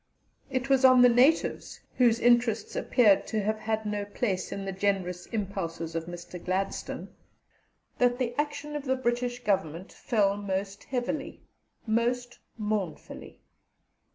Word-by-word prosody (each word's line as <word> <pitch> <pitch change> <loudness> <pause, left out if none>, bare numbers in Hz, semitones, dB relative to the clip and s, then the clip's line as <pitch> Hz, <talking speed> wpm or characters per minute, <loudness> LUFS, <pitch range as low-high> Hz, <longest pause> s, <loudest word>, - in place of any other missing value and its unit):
It 260 0 -2
was 270 -1 +3
on 255 -1 +8
the 245 - +8
natives, 255 +7 +2 0.2
whose 235 -2 +4
interests 240 -2 +2
appeared 210 -6 +3
to 215 -2 -1
have 215 +1 -1
had 220 0 -2
no 210 -1 -2
place 200 -2 -2
in 195 0 -4
the 195 - -3
generous 190 -2 -1
impulses 175 -6 -4
of 165 0 -3
Mr. 175 0 -9
Gladstone, 190 +2 -3 0.9
that 245 0 +3
the 245 -2 -1
action 295 +1 -3
of 295 -1 -4
the 260 0 +1
British 245 -1 -2
Government 185 -4 -1
fell 205 -5 +1
most 200 0 -4
heavily, 270 +3 -3 0.4
most 240 +2 -1 0.2
mournfully. 210 -6 -4
220 Hz, 135 wpm, -28 LUFS, 195-245 Hz, 0.9 s, on